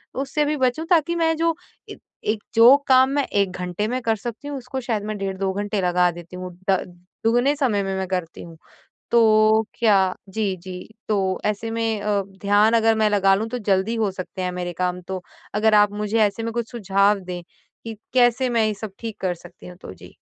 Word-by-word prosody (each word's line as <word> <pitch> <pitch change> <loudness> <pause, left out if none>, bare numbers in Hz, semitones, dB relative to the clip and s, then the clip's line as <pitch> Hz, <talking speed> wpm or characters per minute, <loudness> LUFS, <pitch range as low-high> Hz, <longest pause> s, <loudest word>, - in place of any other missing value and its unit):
उससे 280 +3 -1
भी 300 +1 -1
बचूँ 260 +4 0
ताकि 340 -1 +3
मैं 325 -1 +1
जो 330 0 +1 0.3
ए - - -8 0.4
एक 215 - -9
जो 235 +4 +8
काम 260 0 +5
मैं 280 0 0
1 200 -2 0
घंटे 180 +3 -3
में 255 +2 -2
कर 225 -2 +1
सकती 235 +5 -7
हूँ 290 -1 -4
उसको 260 +1 -5
शायद 225 -4 -2
मैं 215 -1 -4
डेढ़ 195 -1 -4
2 195 0 -1
घंटे 205 0 -2
लगा 180 0 +3
देती 175 +1 -11
हूँ। 180 0 -7 0.2
द 190 -1 +4 0.5
दुगने 245 +5 +3
समय 235 -9 0
में 195 0 -3
मैं 190 0 -2
करती 180 -3 -4
हूँ। 165 -1 -12 0.5
तो 220 -1 +4
क्या 195 -5 +3
जी, 200 -1 -1
जी। 180 +2 -9 0.2
तो 190 -3 0
ऐसे 210 +2 -2
में 225 -2 -1
अ, 205 -1 0 0.2
ध्यान 205 +2 +4
अगर 225 -1 +4
मैं 215 -1 +2
लगा 195 -2 +4
लूँ 220 +3 -2
तो 250 - -3
जल्दी 200 +1 0
हो 215 -4 0
सकते 185 0 -7
हैं 180 0 -1
मेरे 180 -1 -4
काम 180 0 -1
तो 190 -1 -4 0.3
अगर 220 +1 +3
आप 205 -1 +5
मुझे 210 +2 -1
ऐसे 205 +2 -1
में 230 - -2
कुछ 235 -1 -3
सुझाव 200 -2 +2
दें 180 -1 -6 0.4
कि 225 -1 -6 0.2
कैसे 250 0 +3
मैं 230 -2 +2
ये 215 - -1
सब 205 0 -7
ठीक 225 -3 -6
कर 185 -2 0
सकती 175 +1 -14
हूँ? 180 - -11
तो - - -9
जी। - - -15
210 Hz, 215 wpm, -22 LUFS, 190-235 Hz, 0.5 s, जो